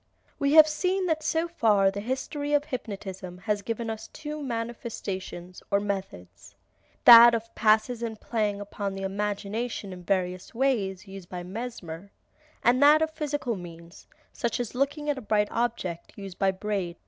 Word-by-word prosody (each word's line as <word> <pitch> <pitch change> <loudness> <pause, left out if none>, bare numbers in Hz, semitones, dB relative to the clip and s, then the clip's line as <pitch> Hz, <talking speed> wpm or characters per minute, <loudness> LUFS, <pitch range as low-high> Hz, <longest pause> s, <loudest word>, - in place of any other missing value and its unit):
We 280 +1 +2
have 315 -1 +9
seen 365 +5 0
that 320 -3 0
so 325 +2 0
far 210 - +3
the 200 - -5
history 270 +6 -3
of 290 0 +3
hypnotism 195 - -6
has 205 +2 -2
given 230 +2 -4
us 220 0 -5
two 300 0 -7
manifestations, 230 -7 -5
or 200 - +3
methods, 190 - -6 0.5
that 235 0 +11
of 230 0 -5
passes 220 +2 +2
and 225 -2 -4
playing 210 -3 -1
upon 200 -1 -4
the 195 - -5
imagination 205 +2 -3
in 180 -1 -10
various 185 +2 -2
ways, 210 -7 0
used 195 -2 -10
by 180 -1 -6
Mesmer, 195 -3 -7 0.5
and 245 +3 +4
that 300 +2 +7
of 315 - -1
physical 290 -6 -2
means, 170 -1 -11 0.3
such 235 -2 -2
as 240 -3 -3
looking 280 +3 -1
at 290 -2 0
a - - -9
bright 210 -2 +1
object, 220 -8 -3
used 195 -2 -9
by 195 - +3
Braid. 190 -2 -3
215 Hz, 160 wpm, -27 LUFS, 195-255 Hz, 0.5 s, that